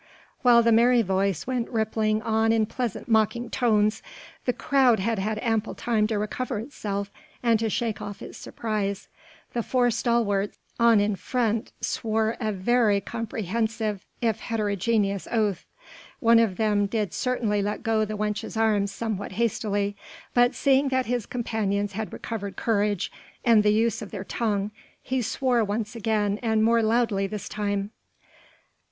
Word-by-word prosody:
Whilst 235 -2 +6
the 230 - +5
merry 235 +1 +5
voice 190 -2 0
went 250 -2 -2
rippling 220 -1 0
on 225 0 +2
in 225 -1 +3
pleasant 235 -1 -4
mocking 230 +1 +1
tones, 215 -3 +2 0.4
the 250 - +3
crowd 260 -4 +3
had 220 +2 0
had 215 +2 -1
ample 225 -2 0
time 220 -3 +1
to 220 -1 -1
recover 225 +3 -2
itself 205 -4 -4 0.3
and 230 -2 +3
to 225 0 0
shake 225 0 -2
off 205 -1 -6
its - - -9
surprise. 200 -3 -3 0.4
The 240 - 0
four 245 +1 +2
stalwarts 220 -4 0 0.2
on 235 -2 +6
in 205 0 +1
front 230 +2 -1
swore 220 0 0
a 220 -3 -1
very 210 +1 +2
comprehensive 220 0 -3 0.2
if 225 -2 +1
heterogeneous 205 -2 0
oath. 210 -6 0 0.5
One 230 -1 +5
of 220 -5 +1
them 210 -2 +2
did 210 -3 -2
certainly 230 -5 0
let 205 +2 -3
go 225 -2 +2
the 215 0 -3
wench's 210 +1 -3
arm 215 -3 +2
somewhat 205 -1 -4
hastily, 205 -2 0 0.4
but 245 +1 +4
seeing 275 0 +3
that 260 -1 +1
his 240 -2 -2
companions 205 -4 -1
had 215 +2 -4
recovered 200 -4 -5
courage 205 -3 0 0.3
and 230 -3 +6
the 210 - +3
use 225 +1 +1
of 210 - -7
their 195 -3 -6
tongue, 205 -1 -1 0.3
he 260 -1 -1
swore 245 +1 +1
once 210 +2 -3
again 210 -2 0
and 220 -2 +2
more 230 +1 +4
loudly 220 -3 +1
this 210 0 -6
time. 205 -1 -2
220 Hz, 155 wpm, -26 LUFS, 205-235 Hz, 0.5 s, Whilst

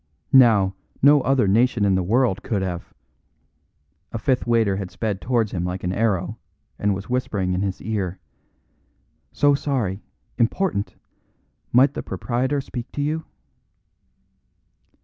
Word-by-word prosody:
Now, 110 -7 +6 0.3
no 145 0 +7
other 130 -5 +2
nation 115 +1 +3
in 100 - +3
the 95 - +2
world 110 +2 +1
could 105 -6 -2
have 90 -2 -5 0.6
" 75 +5 -46
A - - -3
fifth 125 +2 0
waiter 110 -5 +2
had 95 -2 -4
sped 105 -2 -3
towards 115 -3 0
him 90 -2 -2
like 90 +1 -4
an 90 0 -1
arrow, 100 -1 -1 0.4
and 100 -1 +1
was 95 0 -7
whispering 105 -7 -1
in 90 - -1
his 100 -2 -2
ear: 100 -4 -2 1.1
"So 145 -1 +3
sorry. 125 -9 -1 0.4
Important! 120 - 0 0.8
Might 130 +4 +5
the - - -4
proprietor 130 +4 -2
speak 125 -2 -7
to 145 - -3
you?" 155 +2 -2
110 Hz, 140 wpm, -23 LUFS, 95-125 Hz, 1.1 s, no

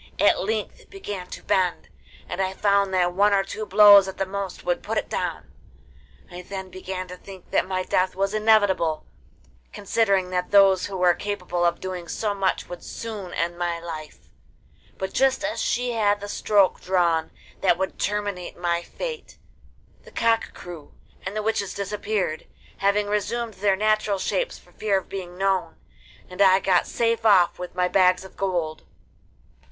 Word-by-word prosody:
At - - +4
length 445 - -3
it - - -21
began 205 - -6
to - - -9
bend, 180 -2 0 0.4
and 190 - -3
I 190 0 -1
found 200 -1 +2
that 180 -1 +1
one 205 +2 +3
or 195 -1 +3
two 210 +2 -6
blows 205 -2 +8
at 190 - -7
the 195 - 0
most 195 -1 -5
would - - -1
put - - -3
it - - -2
down. - - -4 0.8
I 175 +1 -7
then 190 0 -7
began 185 0 -6
to 180 - -8
think 190 0 -13
that - - +2
my 185 -1 -1
death 185 0 0
was 195 +1 0
inevitable, 205 -7 +2 0.7
considering 200 -3 +1
that 180 0 -1
those 195 -2 +5
who 195 -1 -5
were 180 -1 +4
capable 180 -3 -3
of 170 0 +1
doing 185 -2 -6
so 205 +5 -2
much 195 -2 -1
would 175 -1 -9
soon 210 -5 -7
end 170 +1 -2
my 170 -1 -1
life; 160 -2 -9 0.7
but 190 0 -4
just 270 +2 +2
as 305 +1 -2
she 245 0 0
had 205 -3 +1
the 205 - -7
stroke 205 -2 +2
drawn 170 -3 +1 0.3
that 175 -3 +3
would 190 +1 -3
terminate 205 -3 -3
my 170 -1 0
fate, 475 - -7 0.6
the - - -15
cock 230 -1 0
crew, 170 -4 -10 0.3
and 190 - -5
the 215 - -2
witches 210 -3 -1
disappeared, 200 -4 -2 0.3
having 200 +1 +2
resumed 220 +3 -2
their 200 0 +1
natural 215 0 +1
shapes - - -2
for - - -21
fear 205 -2 0
of 190 - -6
being 180 -2 -7
known, 195 -1 0 0.5
and 180 +2 -5
I 190 -1 +6
got 185 -2 +2
safe 230 -1 0
off 195 -6 +4
with 180 0 -7
my 180 0 +2
bags 185 0 +3
of 190 - -13
gold. 175 -5 -2
195 Hz, 175 wpm, -24 LUFS, 180-205 Hz, 0.8 s, blows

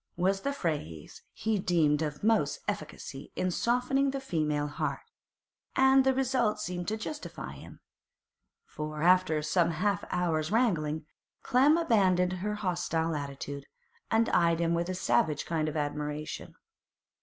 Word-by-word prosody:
was 190 +2 +1
the 280 - -1
phrase 145 - -4
he 220 -2 -1
deemed 160 -5 +2
of 150 0 -3
most 225 - +2
efficacy - - -5
in 185 - 0
softening 250 +7 +1
the 275 0 -2
female 155 - -1
heart; 145 0 -3 0.7
and 265 0 +6
the 265 - +4
result 255 -4 +1
seemed 175 -3 -4
to 220 - -1
justify 300 +7 -6
him, - - -12 0.9
for 155 0 -5
after 180 -3 +4
some 170 +2 +2
half 185 +3 0
hour's 165 -2 0
wrangling, 160 -10 +1 0.4
Clem 280 +6 +4
abandoned 190 - +3
her 210 +1 -1
hostile 170 -4 -1
attitude, 140 0 -6 0.4
and 225 +1 +3
eyed 170 -1 +3
him 170 0 +1
with 170 +1 -1
a 185 - -2
savage 150 -2 +1
kind 155 -2 -1
of 155 - -4
admiration. 150 0 -4
175 Hz, 140 wpm, -30 LUFS, 155-220 Hz, 0.9 s, and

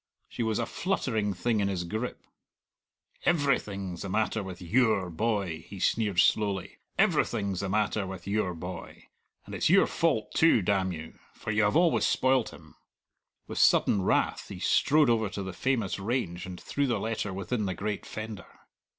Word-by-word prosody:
She - - -6
was 110 -2 0
a - - 0
fluttering 115 - -1
thing 110 +4 0
in 100 - +1
his 95 -3 -2
grip. 110 +8 -4 1.0
"Every 145 -6 +3
thing's 95 -3 -6
the 100 - -5
matter 110 +2 0
with 95 -2 -7
your 100 -1 +2
boy," 95 -4 -1
he 100 - -9
sneered 105 -2 +1
slowly, 100 -3 +1 0.2
"every - - +4
thing's 100 -5 -3
the 100 - -2
matter 105 0 0
with 95 -2 -8
your 100 -3 -1
boy. 90 +3 -8 0.4
And - - -10
it's - - +1
your - - +6
fault - - 0
too, 160 - +4
damn 95 -1 +1
you, 80 -2 -8 0.2
for 110 - -4
you 110 0 +3
always 165 +10 +3
spoiled 130 -2 +2
him!" - - -15 0.7
With - - -5
sudden 100 - +4
wrath - - +1
he - - -7
strode 150 0 +3
over 110 -3 +1
to 100 - -5
the 95 -1 -6
famous 115 -3 -1
range 95 -5 -2
and 90 -1 -7
threw 140 0 -1
the 120 - 0
letter 110 -2 -2
within 100 +3 -2
the 95 - -2
great 105 +2 -3
fender. 110 -2 -7
105 Hz, 175 wpm, -28 LUFS, 95-115 Hz, 1.0 s, your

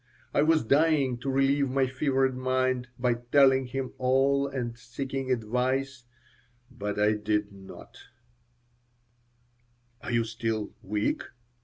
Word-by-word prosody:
I - - +3
was 160 +1 +3
dying 140 -1 +2
to 135 - -4
relieve 135 +1 +2
my 135 +1 +2
fevered 130 0 0
mind 130 -1 0
by 125 -1 +1 0.2
telling 135 -2 +5
him 130 0 -4
all 135 +2 +2
and 125 -4 -4
seeking 130 +2 -5
advice, 125 +3 -1 0.7
but 105 -5 -4
I 105 +1 +4
did 105 -1 -1
not 95 -1 -13 2.0
"Are - - -7
you 115 -1 +2
still 115 -1 -3
weak?" 105 +2 -1
130 Hz, 120 wpm, -28 LUFS, 115-135 Hz, 2.0 s, telling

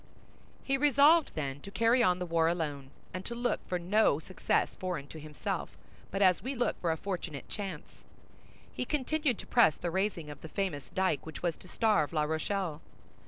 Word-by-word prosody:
He 270 0 +1
resolved, 295 +3 +6
then, 140 -3 -3
to 200 - -9
carry 230 +5 +3
on 180 -5 +4
the 180 - -3
war 165 -1 +2
alone, 150 -5 -2 0.2
and 185 +1 -4
to 235 - -5
look 240 -1 0
for 180 - 0
no 185 -1 +3
success 180 +4 0
foreign 180 -6 -3
to 160 - -9
himself, 150 -2 -4 0.3
but 195 +1 +1
as 185 -2 +5
we 265 +3 -3
look 245 - -1
for 170 - +1
a 160 - -1
fortunate 175 -6 -5
chance. 190 -7 -7 0.7
He - - -2
continued 295 -1 0
to - - -8
press 235 -11 +5
the 175 - -3
raising 185 -5 -1
of 145 - -11
the 160 - -8
famous 180 -8 -3
dyke 185 -6 0
which 160 - -8
was 170 -3 +1
to - - -14
starve 210 -6 +2
La 155 -2 +2
Rochelle. 160 +1 -2
185 Hz, 190 wpm, -31 LUFS, 160-225 Hz, 0.7 s, resolved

